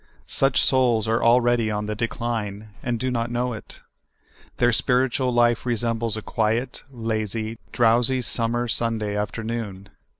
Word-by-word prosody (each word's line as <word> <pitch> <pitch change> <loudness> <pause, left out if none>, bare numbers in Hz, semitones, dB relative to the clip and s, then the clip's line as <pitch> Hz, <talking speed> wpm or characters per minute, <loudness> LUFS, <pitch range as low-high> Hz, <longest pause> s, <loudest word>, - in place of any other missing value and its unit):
Such 135 -1 +2
souls 120 -4 +3
are 115 +1 +1
already 120 -1 +4
on 105 0 -2
the 105 - -2
decline, 110 -2 -3
and 120 -2 -2
do 130 +2 -1
not 115 -1 -1
know 120 +1 -1
it. 110 - -10 0.8
Their 120 -1 +3
spiritual 130 +1 +1
life 120 -1 +3
re 120 -1 0
sembles 115 -1 -1
a 110 - -6
quiet, 115 +4 -1
lazy, 110 -2 -3
drowsy 120 +2 +3
summer 120 +1 0
Sunda}' 110 -3 -1
afternoon. 105 -2 -4
115 Hz, 140 wpm, -24 LUFS, 110-120 Hz, 0.8 s, already